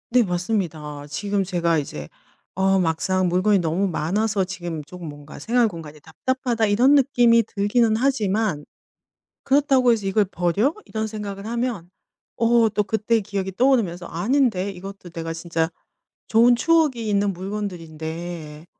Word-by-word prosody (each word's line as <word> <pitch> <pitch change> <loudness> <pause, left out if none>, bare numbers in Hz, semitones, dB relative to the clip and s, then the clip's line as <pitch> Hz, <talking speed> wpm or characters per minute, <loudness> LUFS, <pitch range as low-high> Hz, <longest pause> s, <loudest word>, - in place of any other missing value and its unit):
네 245 0 +4
맞습니다. 175 -6 -3
지금 200 +6 -1
제가 170 -3 0
이제 75 - -5 0.5
어 195 0 +3
막상 185 +2 +1
물건이 190 +3 +3
너무 175 +4 0
많아서 195 +5 0
지금 175 -4 -5
쪼금 170 +2 -10
뭔가 145 0 -10
'생활 240 0 +2
공간이 155 -4 -10
답답하다.' 235 - -1
이런 240 +7 +4
느낌이 240 -4 +4
들기는 220 +2 +1
하지만 215 - 0 0.8
그렇다고 270 -3 +3
해서 220 -4 0
'이걸 200 +2 +2
버려?' 195 - 0
이런 220 0 -3
생각을 205 -2 -6
하면 235 -7 -3 0.5
어 230 -1 +4
또 210 0 0
그때의 220 +2 0
기억이 195 -1 -3
떠오르면서 205 -7 +1
'아닌데 200 - 0
이것도 195 0 -10
내가 165 -1 -5
진짜 165 -1 -2 0.6
좋은 235 +2 +5
추억이 290 -4 +2
있는 200 -1 +1
물건들인데. 170 -4 -6
195 Hz, 320 characters per minute, -23 LUFS, 170-230 Hz, 0.8 s, 좋은